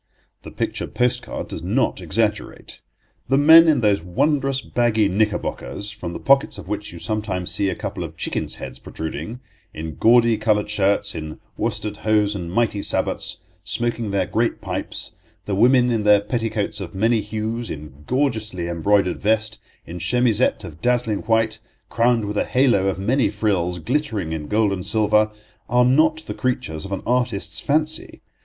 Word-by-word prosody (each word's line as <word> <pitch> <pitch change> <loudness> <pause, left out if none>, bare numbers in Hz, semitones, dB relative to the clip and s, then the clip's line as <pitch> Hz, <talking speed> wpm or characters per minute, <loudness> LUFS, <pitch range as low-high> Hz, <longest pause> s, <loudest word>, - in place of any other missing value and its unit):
The - - -10
picture - - -3
post 125 0 0
card - - -6
does - - -6
not - - 0
exaggerate. - - -2 0.5
The 135 - +4
men 160 +3 +8
in 155 -5 +3
those 105 -5 +2
wondrous 135 - 0
baggy 115 -5 +1
knickerbockers, 105 0 -2
from 100 -5 -6
the - - -6
pockets 140 0 +3
of - - -10
which 105 0 -4
you 85 - -10
sometimes 100 -3 -3
see 100 - +1
a - - -2
couple - - -5
of - - -8
chicken's - - -2
heads - - -8
protruding; 110 +9 -6 0.3
in 80 0 -6
gaudy 115 -1 +5
coloured 105 -1 +1
shirts, 100 -1 +1
in 80 -1 -7 0.2
worsted 105 -2 -2
hose 105 -1 +2
and 90 -4 -5
mighty 105 0 +1
sabots, - - -1 0.3
smoking 120 -2 -2
their 100 0 0
great - - -1
pipes—the 100 - -6
women 125 +4 +4
in 115 -2 +1
their 105 -1 +5
petticoats 110 -1 -2
of 95 0 -7
many 110 +3 +2
hues, 110 +2 -4
in 75 -1 -9
gorgeously 110 -9 -1
embroidered 90 +2 +1
vest, 110 0 0 0.3
in 85 +1 -7
chemisette 120 +3 +2
of 80 -4 -10
dazzling 120 -3 +1
white, 115 -1 +1 0.3
crowned 115 -2 +2
with 105 0 -2
a - - +1
halo 125 -7 +3
of 95 - -1
many 120 +7 +1
frills, 90 -5 0
glittering 110 - -2
in 75 -2 -5
gold 105 -1 +2
and 90 -2 -4
silver—are 110 +3 +1
not 155 +5 +3
the - - -5
creatures 100 - -2
of 95 - -8
an 95 - -3
artist's 125 -5 0
fancy. 155 +2 -1
110 Hz, 160 wpm, -22 LUFS, 100-120 Hz, 0.5 s, men